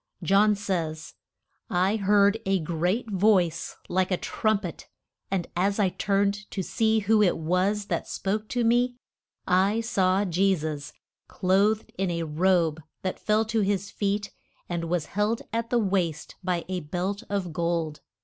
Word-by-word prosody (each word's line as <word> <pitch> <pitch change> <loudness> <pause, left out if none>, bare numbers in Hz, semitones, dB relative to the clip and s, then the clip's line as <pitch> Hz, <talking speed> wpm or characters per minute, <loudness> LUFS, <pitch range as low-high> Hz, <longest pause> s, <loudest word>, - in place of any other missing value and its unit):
John 200 +4 +4
says: 170 -6 -3 0.6
I 185 +4 +2
heard 205 +1 +3
a 195 0 +3
great 175 +7 -1
voice 185 -4 +2
like 185 0 +1
a 185 - +1
trum 215 +2 0
pet, 175 -5 -7 0.4
and 190 -3 -1
as 195 +3 +1
I 200 -3 +3
turned 200 +2 0
to 190 - -3
see 220 +2 +1
who 215 +1 +3
it 190 -4 +3
was 185 +6 0
that - - -2
spoke 210 +2 -2
to 245 -1 0
me, 245 +2 +2 0.5
I 190 +4 +3
saw 195 -3 +2
Je 190 +2 +2
sus 150 -3 -5 0.4
clothed 200 +3 +1
in 190 -1 +1
a 170 -1 -1
robe 165 0 +1 0.2
that 185 - -3
fell 215 +1 +2
to 220 0 0
his 200 0 -1
feet, 200 0 -1 0.4
and 170 -1 -3
was 165 -2 -1
held 210 +5 -1
at 230 0 -1
the 245 - +2
waist 185 -7 -1
by 175 -2 -1
a 185 0 -2
belt 180 +6 -3
of 195 -5 -2
gold. 170 -2 -1
195 Hz, 160 wpm, -26 LUFS, 175-210 Hz, 0.6 s, John